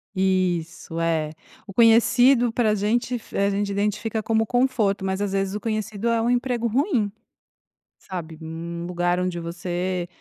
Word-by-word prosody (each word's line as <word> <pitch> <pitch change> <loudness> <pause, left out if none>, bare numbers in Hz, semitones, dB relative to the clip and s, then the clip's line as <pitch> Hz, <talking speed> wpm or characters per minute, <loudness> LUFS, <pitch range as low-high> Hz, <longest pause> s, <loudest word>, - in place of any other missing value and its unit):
Isso. 180 -3 0
É. 160 -2 0 0.4
O 200 - -9
conhecido 235 +2 +5
pra 225 -2 +2
gente 235 +5 0
f 230 - -7
a 200 0 +3
gente 200 0 -1
identifica 210 +2 -1
como 225 0 +1
conforto 225 -6 +1
mas, 190 +1 -1
às 200 -1 -1
vezes, 195 0 -1
o - - -2
conhecido 215 0 -3
é 230 -1 +2
um 235 - +1
emprego 245 -1 0
ruim, 245 - +1 0.9
sabe, 165 -4 -7
um 170 +1 -6
lugar 175 0 0
onde 180 -1 -2
você, 175 +1 -3
200 Hz, 155 wpm, -24 LUFS, 175-230 Hz, 0.9 s, conhecido